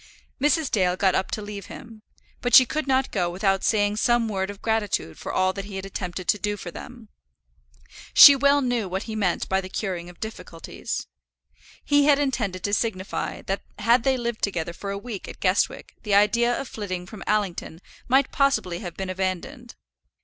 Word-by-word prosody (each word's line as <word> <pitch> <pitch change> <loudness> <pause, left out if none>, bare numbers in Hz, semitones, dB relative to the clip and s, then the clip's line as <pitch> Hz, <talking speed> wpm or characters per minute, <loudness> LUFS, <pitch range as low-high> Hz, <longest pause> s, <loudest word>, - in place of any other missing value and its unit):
Mrs. 295 0 +2
Dale 180 -4 +2
got 190 0 +2
up 190 - 0
to 215 - -4
leave 205 -2 -7
him, 225 -2 -11 0.4
but 245 - +3
she 255 - +10
could 305 +3 -3
not 265 -1 +1
go 180 -4 0
without 195 +2 0
saying 205 -1 +1
some 240 0 +2
word 190 -2 -2
of 205 -1 -8
gratitude 210 - -1
for - - -5
all 185 0 +1
that 195 0 -6
he 200 -1 -9
had 190 0 -5
attempted 180 -2 -5
to 210 - +3
do 205 0 -2
for 175 - -7
them. 235 +1 -11 1.1
She 285 - +11
well 280 +1 +3
knew 245 -6 -1
what 190 +3 -3
he 220 - -6
meant 190 -5 0
by 190 0 +1
the 185 - -9
curing 180 -4 -4
of 175 - -15
difficulties. 220 +1 -6 0.8
He 290 -1 +4
had 290 -1 +5
intended 235 -10 -2
to 205 - -1
signify 200 -4 -2
that 195 +1 -3 0.2
had 235 +2 +3
they 265 +1 +1
lived 235 -2 -3
together 170 -4 -2
for 200 +3 -7
a 200 - -3
week 210 -2 -7
at - - -10
Guestwick 185 0 0
the 210 -3 0
idea 235 +4 +3
of 275 - -5
flitting 185 -6 -5
from 205 +2 -11
Allington 200 -6 -1 0.3
might 265 +1 +3
possibly 275 - +1
have 175 -4 -8
been 190 -1 -3
abandoned. 190 +7 -4
205 Hz, 195 wpm, -24 LUFS, 190-240 Hz, 1.1 s, She